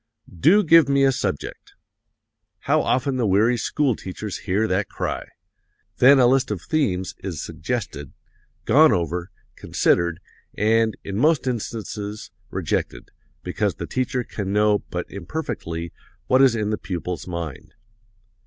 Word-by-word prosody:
"'Do 205 Hz, -, +5 dB
give 165 Hz, -4 st, +6 dB
me 140 Hz, 0 st, +3 dB
a 135 Hz, -, +5 dB
subject!' 120 Hz, -, -4 dB, 0.9 s
How -, -, +2 dB
often 130 Hz, +1 st, 0 dB
the 120 Hz, -4 st, +1 dB
weary 105 Hz, +6 st, +3 dB
school 130 Hz, +2 st, 0 dB
teacher 100 Hz, +3 st, -7 dB
hears 100 Hz, +3 st, -1 dB
that 100 Hz, +2 st, 0 dB
cry. -, -, -4 dB, 0.7 s
Then 135 Hz, +3 st, +7 dB
a 130 Hz, -, +5 dB
list 130 Hz, +1 st, +3 dB
of 105 Hz, -3 st, -2 dB
themes 95 Hz, -, -1 dB
is 90 Hz, -6 st, -5 dB
suggested, 80 Hz, -, -5 dB, 0.5 s
gone -, -, +6 dB
over, 85 Hz, +1 st, -1 dB, 0.3 s
considered, 85 Hz, -1 st, +1 dB, 0.4 s
and, 110 Hz, +1 st, +2 dB
in 100 Hz, 0 st, -5 dB
most 150 Hz, +4 st, +3 dB
instances, 110 Hz, -3 st, -4 dB, 0.2 s
rejected, -, -, -3 dB, 0.3 s
because -, -, -1 dB
the -, -, -5 dB
teacher 130 Hz, -1 st, -2 dB
can 100 Hz, -4 st, -5 dB
know 105 Hz, 0 st, +3 dB
but 90 Hz, +1 st, -3 dB
imperfectly 85 Hz, -, -5 dB, 0.3 s
what 130 Hz, +1 st, +4 dB
is 130 Hz, -4 st, +5 dB
in 105 Hz, -1 st, -1 dB
the 105 Hz, -, -2 dB
pupil's 90 Hz, -1 st, -5 dB
mind. 85 Hz, -3 st, -6 dB
105 Hz, 135 wpm, -23 LUFS, 90-130 Hz, 0.9 s, Then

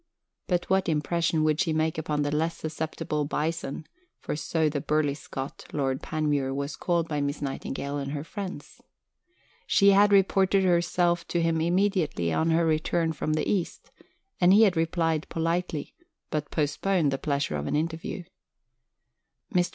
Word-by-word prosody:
But 175 Hz, -1 st, 0 dB
what 190 Hz, -1 st, +2 dB
impression 160 Hz, +1 st, +1 dB
would 155 Hz, +1 st, +2 dB
she 165 Hz, -4 st, +1 dB
make 155 Hz, 0 st, 0 dB
upon 150 Hz, -2 st, -1 dB
the 145 Hz, +1 st, -1 dB
less 165 Hz, +2 st, 0 dB
susceptible 155 Hz, -1 st, -3 dB
"Bison" 155 Hz, 0 st, -3 dB, 0.3 s
(for -, -, -4 dB
so 160 Hz, +1 st, 0 dB
the 145 Hz, -1 st, -1 dB
burly 150 Hz, -1 st, +1 dB
Scot, 135 Hz, -1 st, -7 dB
Lord 135 Hz, -2 st, -1 dB
Panmure, 150 Hz, -5 st, -1 dB
was 140 Hz, +1 st, -3 dB
called 170 Hz, -2 st, 0 dB
by 150 Hz, -3 st, -2 dB
Miss 140 Hz, 0 st, -2 dB
Nightingale 140 Hz, 0 st, -4 dB
and 140 Hz, 0 st, -4 dB
her 145 Hz, -1 st, -3 dB
friends)? 195 Hz, +2 st, -7 dB, 0.9 s
She 200 Hz, 0 st, +5 dB
had 205 Hz, +1 st, +5 dB
reported 195 Hz, 0 st, +4 dB
herself 175 Hz, -1 st, +2 dB
to 175 Hz, -, 0 dB
him 165 Hz, -1 st, +1 dB
immediately 170 Hz, -, +1 dB
on 160 Hz, -, +1 dB
her 165 Hz, +1 st, +3 dB
return 160 Hz, +1 st, +1 dB
from 155 Hz, 0 st, -2 dB
the 155 Hz, -1 st, 0 dB
East, 185 Hz, -5 st, -2 dB, 0.5 s
and 175 Hz, 0 st, +5 dB
he 215 Hz, +3 st, +7 dB
had 195 Hz, -4 st, +4 dB
replied 165 Hz, -1 st, 0 dB
politely, 165 Hz, -, -2 dB, 0.4 s
but 150 Hz, -1 st, -2 dB
postponed 155 Hz, +1 st, +1 dB
the 135 Hz, -, -2 dB
pleasure 140 Hz, -, -1 dB
of 75 Hz, 0 st, -3 dB
an -, -, -1 dB
interview. 165 Hz, +3 st, -3 dB, 1.3 s
Mr. 180 Hz, -1 st, +2 dB
160 Hz, 160 wpm, -27 LUFS, 150-175 Hz, 1.3 s, he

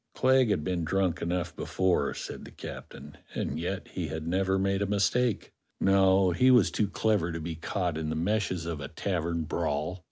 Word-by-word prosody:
"Clegg 130 Hz, -2 st, +4 dB
had 95 Hz, -7 st, +1 dB
been 85 Hz, +1 st, -1 dB
drunk 90 Hz, 0 st, 0 dB
enough 85 Hz, 0 st, -2 dB
before," 95 Hz, -1 st, 0 dB
said -, -, -6 dB
the -, -, -10 dB
captain, 75 Hz, +2 st, -9 dB, 0.2 s
"and -, -, -2 dB
yet 90 Hz, +3 st, -3 dB
he -, -, -4 dB
had 80 Hz, 0 st, -5 dB
never 95 Hz, +3 st, +1 dB
made 95 Hz, +1 st, +1 dB
a 100 Hz, -, +1 dB
mistake. 105 Hz, +3 st, +1 dB, 0.3 s
No, 95 Hz, -1 st, +4 dB
he 125 Hz, +10 st, +4 dB
was 125 Hz, -6 st, +5 dB
too 105 Hz, -, +1 dB
clever 100 Hz, -4 st, +1 dB
to 85 Hz, -, -4 dB
be 80 Hz, +1 st, -4 dB
caught 85 Hz, 0 st, -2 dB
in 80 Hz, -1 st, -3 dB
the 80 Hz, -, -2 dB
meshes 90 Hz, 0 st, 0 dB
of 80 Hz, -3 st, -4 dB
a 70 Hz, -, -4 dB
tavern 85 Hz, -1 st, -2 dB
brawl. 75 Hz, +4 st, -2 dB
90 Hz, 190 wpm, -29 LUFS, 80-100 Hz, 0.3 s, was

